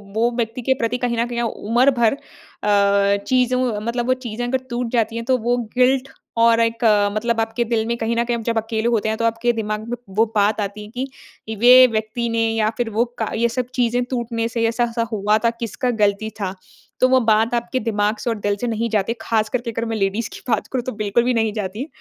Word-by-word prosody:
वो 235 +2 +2
व्यक्ति 230 +1 -2
के 265 +2 +2
प्रति 230 +2 0
कहीं 245 -1 -1
न 230 - +1
कहीं 240 0 -3
ओ 235 - +1
उम्र 240 +5 +2
भर 225 -2 +4
अ, 200 -6 0
चीज़ों 255 -3 +1
मतलब 235 +2 -2
वो 255 - +4
चीज़ें 235 +1 -3
अगर 260 +2 +1
टूट 240 -1 -2
जाती 230 -2 0
हैं 230 0 -4
तो 255 0 +2
वो 240 +1 0 0.2
गिल्ट 260 +1 +3 0.3
और 230 0 +5
एक 230 0 0
अ, 205 -2 +4
मतलब 235 +1 0
आपके 225 +2 -1
दिल 225 -1 0
में 235 - 0
कहीं 230 0 -1
न 235 - +2
कहीं 235 0 -1
आप 225 - -6
जब 230 0 -1
अकेले 225 +1 -1
होते 220 -2 +1
हैं 220 - -1
तो 230 - -1
आपके 230 +1 +1
दिमाग 215 0 -3
में 245 - -3 0.2
वो 225 - +5
बात 210 +1 +2
आती 205 +1 -4
है - - -12 0.6
कि 220 - -5
वे 250 +2 +8
व्यक्ति 220 +1 -2
ने 230 0 +1
या 215 -1 +2
फिर 240 -2 -1
वो 225 +2 +1
का 220 - -1
ये 235 +1 +1
सब 250 +1 -2
चीज़ें 245 0 +1
टूटने 235 -2 -2
से 230 0 -2
ऐसा-ऐसा 235 0 0
हुआ 210 0 +2
था, 230 +1 +1
किसका 235 +2 -3
गलती 210 -1 +1
था? 190 -2 -3 0.4
तो 255 - +5
वो 260 0 +5
बात 225 0 +2
आपके 235 +2 -1
दिमाग 210 -2 0
से 240 - -3
और 230 - 0
दिल 205 0 0
से 245 - -1
नहीं 230 0 -1
जाती, 215 0 0
ख़ासकर 225 +2 0
के 235 -1 -4
अगर 230 +1 -3
मैं 225 -1 -3
लेडीज़ 200 +2 -1
की - - -8
बात 220 -3 0
करूँ 255 -2 -1
तो 255 - -2
बिल्कुल 215 +1 0
भी 250 +1 +1
नहीं 225 -2 +1
जाती 205 -1 -4
है। 290 - -4
230 Hz, 245 wpm, -21 LUFS, 220-240 Hz, 0.6 s, वे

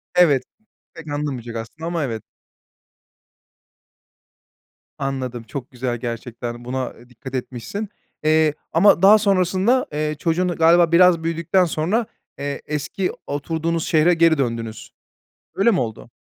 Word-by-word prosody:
Evet. 160 -7 +5 0.5
Pek 165 -1 -11
anlamayacak 140 -6 -4
aslında 115 +9 -6
ama 170 -2 -1
evet. 115 -5 -4 2.7
Anladım, 130 -3 -3
çok 125 +2 -7
güzel 125 -1 -3
gerçekten. 120 0 -6
Buna, 130 0 -3
eee, 120 - -18
dikkat 130 +2 -9
etmişsin. 130 - -5 0.3
Eee, 155 -1 +3 0.2
ama 170 +1 +5
daha 205 +3 +8
sonrasında, 195 +4 +2
eee, 150 0 -1
çocuğun 170 +3 +1
galiba 170 0 +4
biraz 170 -1 +5
büyüdükten 165 +3 +1
sonra, 175 +8 0 0.3
eee, 140 0 -4
eski 150 +5 -2 0.2
oturduğunuz 160 +3 -2
şehre 165 +1 +4
geri 165 -2 +4
döndünüz. 115 -4 -3 0.6
Öyle 215 +4 +4
mi 185 - +1
oldu? 115 -1 -4
155 Hz, 120 wpm, -21 LUFS, 125-175 Hz, 2.7 s, daha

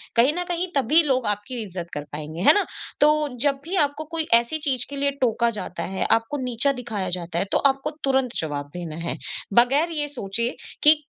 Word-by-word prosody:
कहीं 245 +5 +5
न 355 - 0
कहीं 350 +1 -1
तभी 285 +4 +4
लोग 260 -4 +1
आपकी 210 +4 -3
इज़्ज़त 180 -4 -6
कर 145 - -4
पाएँगे, 155 +3 -6
है - - +8
ना? 410 - +2 0.4
तो, 300 0 +4
जब 280 -1 +2
भी 345 +5 -4
आपको 300 -3 +1
कोई 325 -1 -1
ऐसी 235 +6 +4
चीज़ 270 -5 -1
के 285 - -6
लिए 280 0 +1
टोका 235 -1 +2
जाता 210 -6 -4
है, 190 +2 -2
आपको 230 +6 +2
नीचा 250 +2 +1
दिखाया 210 -6 -3
जाता 170 -1 -4
है, - - 0
तो - - +4
आपको 275 +2 +1
तुरंत 265 -2 +1
जवाब 145 -2 -4
देना 170 -3 -6
है। - - -2 0.4
बगैर 270 - +4
ये 300 -2 0
सोचे, 235 -4 -1 0.3
कि 300 +1 +9
250 Hz, 205 wpm, -24 LUFS, 205-295 Hz, 0.4 s, कि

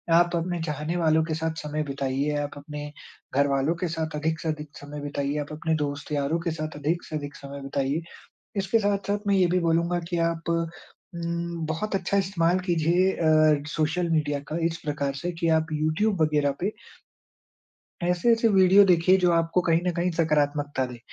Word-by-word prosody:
आप 175 0 +4
अपने 170 0 -2
चाहने 150 +2 -3
वालों 160 -2 +3
के 160 - -3
साथ 160 0 -2
समय 150 +1 -2
बिताइए। 140 +1 -1
आप 145 - -5
अपने 150 0 -7 0.4
घरवालों 140 +3 +2
के 180 - +1
साथ 160 -1 -3
अधिक 155 +1 -1
से 160 - -3
अधिक 150 -1 -5
समय 145 +1 -8
बिताइए। 145 0 -2
आप 145 - -7
अपने 160 +1 -1
दोस्त 145 -1 -3
यारों 145 +3 0
के 170 0 -2
साथ 155 -1 -5
अधिक 155 +4 -1
से 155 - -6
अधिक 145 -1 -7
समय 140 0 -9
बिताइए। 140 +2 -1 0.6
इसके 195 +3 +2
साथ-साथ 200 -1 0
मैं 200 - +3
ये 185 -2 +4
भी 180 +1 +2
बोलूँगा 170 +1 +1
कि 175 - -1
आप 165 0 -6 0.7
उम, 170 0 -3
बहुत 180 +7 -2
अच्छा 195 +1 0
इस्तेमाल 185 -2 +1
कीजिए 175 +2 +3
अ, 155 -3 +3
सोशल 160 +3 0
मीडिया 150 -2 +1
का 155 - -3
इस 165 0 -1
प्रकार 145 -2 -1
से 175 +6 -3
कि 170 - +1
आप 160 0 +2
यूट्यूब 155 +6 +1
वग़ैरह 150 -2 +2
पे 195 +4 0 1.3
ऐसे-ऐसे 225 +7 +3
वीडियो 195 0 +6
देखिए 180 0 +5
जो 180 - +5
आपको 165 +2 +2
कहीं 165 0 +3
न - - +3
कहीं 175 +1 0
सकारात्मकता 145 -4 +1
दे। 125 -1 -9
160 Hz, 180 wpm, -26 LUFS, 150-175 Hz, 1.3 s, वीडियो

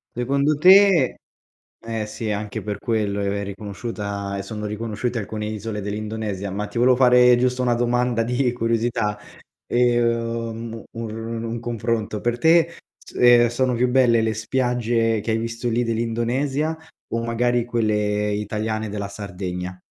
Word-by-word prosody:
Secondo 140 +5 +1
te 185 -3 +6 0.7
eh 115 -2 -3
sì 110 0 -4
anche 105 0 -4
per 105 -1 -4
quello 105 -3 -1
è 100 - -1
è 100 0 -1
riconosciuta 100 0 -5
ehm, 100 - -3
sono 105 +2 -6
riconosciute 115 +3 -3
alcune 105 +1 -5
isole 105 0 -4
dell'Indonesia. 105 -1 -4
Ma 100 +2 -3
ti 115 - -4
volevo 125 +1 +5
fare 125 -1 +6
giusto 125 +1 +1
una 120 -1 +2
domanda 120 0 +1
di 125 +2 0
curiosità, 115 -3 -1 0.5
ehm, 115 -1 0
ur 115 -2 -6
un 115 +1 -4
confronto, 115 -2 -2
per 120 0 0
te 165 +4 +4 0.2
s - - -16
ehm, 120 -1 +6
sono 125 +2 0
più 125 +1 +2
belle 125 -3 +4
le 110 0 0
spiagge 115 -1 0
che 110 +2 -3
hai 110 - +1
visto 115 +1 -3
lì 120 +1 +1
dell'Indonesia 120 +7 -1 0.3
o 115 0 -2
magari 120 +1 +1
quelle 105 -3 0
italiane 110 +1 -2
della 100 -1 -4
Sardegna? 90 -2 -6
115 Hz, 150 wpm, -22 LUFS, 105-120 Hz, 0.7 s, te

